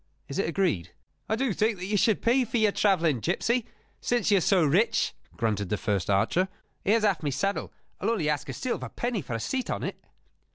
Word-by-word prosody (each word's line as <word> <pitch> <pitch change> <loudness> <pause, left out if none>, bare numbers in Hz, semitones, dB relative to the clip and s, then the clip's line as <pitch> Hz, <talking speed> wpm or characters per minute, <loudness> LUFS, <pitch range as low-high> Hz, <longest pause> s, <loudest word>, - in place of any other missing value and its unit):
Is 140 - -4
it 195 - +1
agreed?" 105 - 0 0.4
"I 220 - +2
do 245 -2 0
think 215 +2 +1
that 180 - -5
you 205 +2 -1
should 210 +1 +2
pay 250 +3 +4
for 240 0 -2
your 215 -2 +4
travelling, 170 - +2
gipsy, 235 - 0 0.3
since 240 -3 +1
you 200 - +6
are - - -3
so 185 0 +4
rich," 180 +11 +2 0.2
grunted 105 -4 -1
the 105 - 0
first 100 -4 -1
archer. 135 - +2 0.4
"Here's 215 +2 +3
half 200 -5 +2
my 150 - -1
saddle: 195 +8 -1 0.3
I'll 200 - 0
only 200 -10 0
ask 150 -2 -1
a - - -3
silver 255 - -3
penny 240 -4 -2
for 125 - -6
a - - -2
seat 260 - -2
on - - -2
it." - - -5
195 Hz, 215 wpm, -27 LUFS, 145-220 Hz, 0.4 s, you